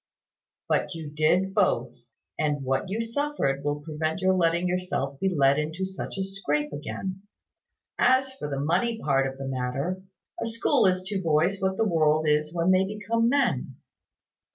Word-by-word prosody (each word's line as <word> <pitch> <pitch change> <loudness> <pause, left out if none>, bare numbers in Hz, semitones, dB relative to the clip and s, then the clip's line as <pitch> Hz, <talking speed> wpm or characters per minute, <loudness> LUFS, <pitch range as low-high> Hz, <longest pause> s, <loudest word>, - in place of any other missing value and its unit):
"But 185 - 0
you 160 -3 -7
did 175 +6 +2
both; 130 - +1 0.5
and 145 -2 0
what 135 +8 -1
you 220 +4 -1
suffered 230 - -1
will 145 0 -1
prevent 155 +2 -3
your 190 0 +3
letting 170 0 +2
yourself 175 -7 -2
be 195 - +1
led 140 -4 +3
into 160 +5 -2
such 190 +1 -6
a 190 - 0
scrape 150 -7 -2
again. 185 +6 -5 0.8
As 260 +1 +3
for 150 - -6
the 140 -1 -3
money 180 +11 +1
part 135 -5 +2
of 135 0 -7
the 135 0 -5
matter 135 +8 -2 0.4
a - - -1
school 225 -2 +3
is 185 0 +1
to 195 0 -3
boys 170 +4 +1
what 190 0 0
the 225 - +2
world 155 -3 +2
is 150 0 +2
when 170 +2 +2
they 185 0 +4
become 215 +4 0
men. 240 - +1
170 Hz, 170 wpm, -26 LUFS, 145-195 Hz, 0.8 s, they